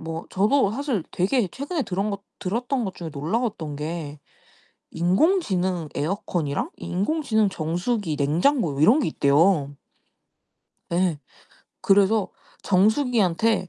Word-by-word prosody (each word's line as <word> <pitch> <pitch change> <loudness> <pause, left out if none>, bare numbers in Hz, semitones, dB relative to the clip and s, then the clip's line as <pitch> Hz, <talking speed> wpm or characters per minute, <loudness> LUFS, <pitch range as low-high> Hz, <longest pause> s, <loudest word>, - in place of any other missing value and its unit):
뭐 165 0 -5
저도 205 +3 +2
사실 255 - -2
되게 195 +3 +1
최근에 285 - -3
들은 195 +1 -2
것 200 0 -5 0.2
들었던 240 +6 -2
것 190 - -4
중에 170 -2 -7
놀라웠던 160 - -2
게 150 -1 -5 0.7
인공지능 185 - +1
에어컨이랑 155 -3 -2
인공지능 220 - 0
정수기, 175 +2 -2
냉장고 155 - +1
이런 225 - +5
게 - - 0
있대요. 145 0 +2 1.2
예. 175 -3 +1 0.6
그래서 200 +1 +3 0.3
정수기한테 215 -1 +2
190 Hz, 255 characters per minute, -24 LUFS, 165-230 Hz, 1.2 s, 이런